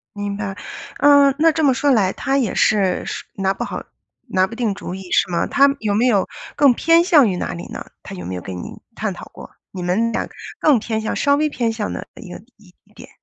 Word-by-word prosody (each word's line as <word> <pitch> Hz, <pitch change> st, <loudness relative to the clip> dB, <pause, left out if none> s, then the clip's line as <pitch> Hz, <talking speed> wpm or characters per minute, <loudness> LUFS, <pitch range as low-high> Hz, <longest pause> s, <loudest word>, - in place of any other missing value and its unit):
明 205 Hz, -1 st, -3 dB
白， 195 Hz, -2 st, -4 dB, 0.4 s
嗯 285 Hz, -1 st, +6 dB
那 325 Hz, +2 st, +4 dB
这 315 Hz, 0 st, -1 dB
么 275 Hz, -3 st, +4 dB
说 285 Hz, +3 st, +1 dB
来， 200 Hz, -7 st, +3 dB
他 270 Hz, 0 st, -1 dB
也 240 Hz, -8 st, 0 dB
是 200 Hz, -4 st, +2 dB
是 -, -, -5 dB
拿 195 Hz, 0 st, 0 dB
不 -, -, -4 dB
好 -, -, -5 dB, 0.4 s
拿 185 Hz, 0 st, +2 dB
不 230 Hz, -, -9 dB
定 230 Hz, -4 st, -1 dB
主 185 Hz, -, -7 dB
意 190 Hz, -1 st, -9 dB
是 -, -, +2 dB
吗？ 170 Hz, -, +1 dB
他 280 Hz, 0 st, +4 dB
有 210 Hz, -2 st, -1 dB
没 225 Hz, +5 st, +2 dB
有 205 Hz, -6 st, +2 dB, 0.3 s
更 280 Hz, -3 st, +5 dB
偏 330 Hz, +6 st, +4 dB
向 305 Hz, -8 st, +5 dB
于 185 Hz, -, -2 dB
哪 -, -, -3 dB
里 175 Hz, -, -7 dB
呢？ -, -, -7 dB, 0.2 s
他 -, -, -8 dB
有 90 Hz, -, -8 dB
没 90 Hz, +1 st, -4 dB
有 90 Hz, -, -5 dB
跟 95 Hz, +1 st, -7 dB
你 90 Hz, -, -9 dB
探 -, -, -2 dB
讨 -, -, -10 dB
过， -, -, -12 dB, 0.2 s
你 185 Hz, -, -7 dB
们 210 Hz, +6 st, +1 dB
俩 -, -, -2 dB, 0.3 s
更 290 Hz, -6 st, +4 dB
偏 220 Hz, 0 st, -3 dB
向 220 Hz, -, -3 dB
稍 280 Hz, 0 st, +3 dB
微 305 Hz, +1 st, +1 dB
偏 235 Hz, -5 st, -1 dB
向 220 Hz, -2 st, -3 dB
哪 -, -, -6 dB
一 200 Hz, -7 st, -11 dB
个 -, -, -8 dB, 0.2 s
一 200 Hz, -4 st, -21 dB, 0.2 s
点。 -, -, -13 dB
220 Hz, 260 characters per minute, -20 LUFS, 190-275 Hz, 0.4 s, 嗯